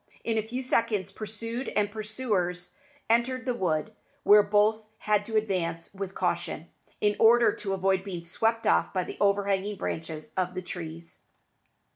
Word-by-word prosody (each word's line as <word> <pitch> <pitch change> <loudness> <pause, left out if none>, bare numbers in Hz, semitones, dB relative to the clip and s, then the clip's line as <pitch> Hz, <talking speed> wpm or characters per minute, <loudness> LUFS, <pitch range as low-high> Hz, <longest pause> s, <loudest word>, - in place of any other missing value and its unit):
In 225 - 0
a 220 - +2
few 245 +4 -5
seconds 225 -6 0
pursued 230 +4 -4
and 205 -1 +2
pursuers 210 -5 -2 0.3
entered 250 +3 +1
the 250 - +1
wood, 160 -9 -1 0.3
where 210 +1 +8
both 210 +2 +3 0.2
had 210 -1 +1
to 220 -1 0
advance 180 -6 -1
with 195 -1 -6
caution, - - -2 0.3
in 210 0 +3
order 235 +1 +6
to 195 -2 -3
avoid 190 0 +1
being 180 -4 -6
swept 225 +6 0
off - - +3
by 185 - +2
the - - -8
overhanging 200 0 +1
branches 160 -3 -5
of 180 -1 -1
the 185 - -4
trees. 165 -1 -8
205 Hz, 155 wpm, -28 LUFS, 185-220 Hz, 0.3 s, where